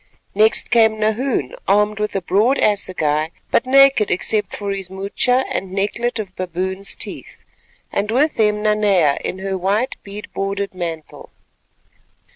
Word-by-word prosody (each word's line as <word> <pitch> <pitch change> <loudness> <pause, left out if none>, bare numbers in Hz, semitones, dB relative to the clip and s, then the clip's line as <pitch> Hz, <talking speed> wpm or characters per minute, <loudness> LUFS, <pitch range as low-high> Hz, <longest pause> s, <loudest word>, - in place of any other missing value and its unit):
Next 215 +4 +2
came 220 -2 +4
Nahoon, 220 - -1
armed 210 +1 +2
with 210 -1 -2
a 195 - -1
broad 220 +10 +2
assegai, 160 -7 +1 0.2
but 245 - +2
naked 275 -4 +5
except 210 +3 0
for 200 -1 -4
his 195 -2 -4
moocha 200 +7 0
and 190 -1 -4
necklet 215 +5 -1
of 200 -4 -6
baboon's 185 +2 -3
teeth, - - -8 0.5
and 205 +1 -1
with 275 +6 +1
him 210 -1 +2
Nanea 200 -8 +3
in - - -3
her 190 0 -3
white 205 +7 0
bead 205 +1 -8
bordered 195 0 -3
mantle. 165 -4 -6
200 Hz, 140 wpm, -19 LUFS, 190-220 Hz, 0.5 s, naked